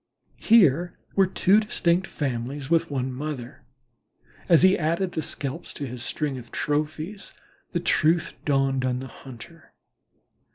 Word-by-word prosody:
Here 175 - +4 0.2
were 195 -1 +4
two 190 +2 +4
distinct 185 -4 0
families 135 +1 -4
with 165 0 +3
one 130 -2 -2
mother, 135 -2 -6 0.5
and - - -28
as 170 -1 +6
he 190 +1 +6
added 170 +3 0
their 160 - -2
scalps 145 +2 -5
to 145 - -4
his 125 -1 -7
string 140 0 -3
of 120 -1 -14
trophies 155 +7 -3 0.4
the 175 - -1
truth 165 0 +2
dawned 135 -2 +1
on 125 -1 0
the 130 - -6
hunter. 135 +6 -13
150 Hz, 140 wpm, -25 LUFS, 130-175 Hz, 0.5 s, as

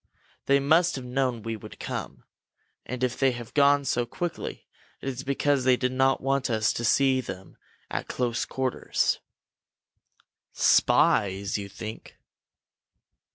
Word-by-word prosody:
They 140 0 +5
must 160 +6 +3
have 130 -2 -6
known 125 -3 -1
we 115 0 -3
would 105 - -11
come, - - -5 0.6
and 125 0 -4
if 125 -1 -1
they 135 -2 +3
have 120 -1 -8
gone 140 -1 +4
so 120 -2 0
quickly, 175 +5 -5 0.3
it - - -8
is 130 -1 -4
because 140 0 +1
they 130 -1 +4
did 125 0 0
not 130 +1 +2
want 135 0 0
us 110 -2 +1
to 120 - -4
see 130 +2 +3
them 95 -6 -9 0.4
at - - -3
close 120 -2 -1
quarters." 130 -2 -1 1.3
"Spies, 100 +1 +3
you 100 -1 -6
think?" 110 +3 -9
130 Hz, 140 wpm, -26 LUFS, 115-135 Hz, 1.3 s, They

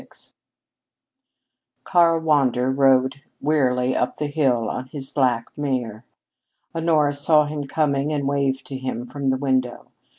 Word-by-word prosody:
XXVI - - -14 1.5
Karl 170 -3 +3
Wander 130 -5 +2
rode 135 0 +2 0.2
wearily 130 -4 +1
up 125 - -1
the 150 - -3
hill 135 -6 0
on 130 +3 -4
his 135 0 -5
black 125 -5 0
mare. 125 -6 -3 0.7
Honora 160 -3 +2
saw 150 +1 +3
him 145 -1 -5
coming 145 0 0
and 145 -2 -1
waved 140 -1 -1
to 135 - -5
him 130 -2 -4
from 135 +2 -3
the 130 - +1
window. 130 -3 -2
135 Hz, 135 wpm, -22 LUFS, 130-150 Hz, 1.5 s, Karl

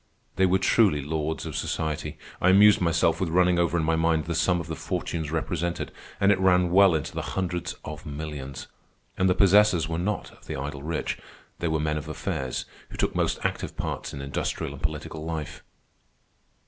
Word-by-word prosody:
They 95 - +4
were 95 +1 +3
truly 95 -5 +3
lords 80 +1 -2
of - - -5
society. 80 -2 -2 0.2
I 95 - +5
amused 100 +2 +7
myself 85 -1 +2
with 90 - 0
running 90 +1 +3
over 85 0 +2
in 80 - +1
my 80 +1 +2
mind 80 -1 +2
the 85 - -2
sum 85 +2 +2
of 85 - -5
the 80 0 -5
fortunes 80 -1 -3
represented, 85 +2 -2 0.3
and 100 +1 +5
it 95 - +2
ran 90 -2 +4
well 95 -2 +6
into 75 - -3
the - - -2
hundreds 90 -2 -3
of 75 0 -7
millions. 75 -2 -6 0.5
And 95 0 +2
the 90 - +3
possessors 100 -4 +5
were 80 +1 -2
not 105 +4 -2
of - - -20
the - - -4
idle 70 +1 -5
rich. 75 +2 -3 0.4
They 85 - -1
were 80 -1 0
men 75 0 0
of 75 0 -6
affairs 65 -4 -3 0.2
who - - -9
took - - 0
most - - 0
active - - -3
parts - - -3
in 70 - -6
industrial 70 0 -3
and 70 - -10
political 80 0 -4
life. 80 -2 -5
80 Hz, 195 wpm, -26 LUFS, 75-90 Hz, 0.5 s, amused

